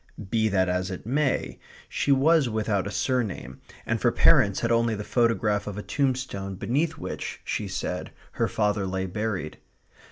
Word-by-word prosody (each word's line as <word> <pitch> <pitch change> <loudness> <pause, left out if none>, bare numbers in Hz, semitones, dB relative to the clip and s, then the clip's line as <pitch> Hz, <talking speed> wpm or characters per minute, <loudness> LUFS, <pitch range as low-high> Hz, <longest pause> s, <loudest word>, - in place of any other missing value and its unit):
Be 110 -1 +2
that 95 -2 +2
as 90 0 -1
it 95 0 -6
may, 135 +3 0 0.3
she 145 - 0
was 140 0 +4
without 105 -3 0
a - - -3
surname, 100 - -2 0.2
and - - -1
for - - +4
parents 100 -1 +4
had 115 - 0
only 115 -1 +2
the 105 - -5
photograph 115 -3 +1
of 105 -1 -5
a 105 - -4
tombstone 125 -8 -1
beneath 145 - -1
which, - - -5
she - - -2
said, - - -3 0.2
her - - 0
father 105 -2 0
lay 95 0 -2
buried. 100 -4 -3
105 Hz, 165 wpm, -26 LUFS, 95-125 Hz, 0.3 s, was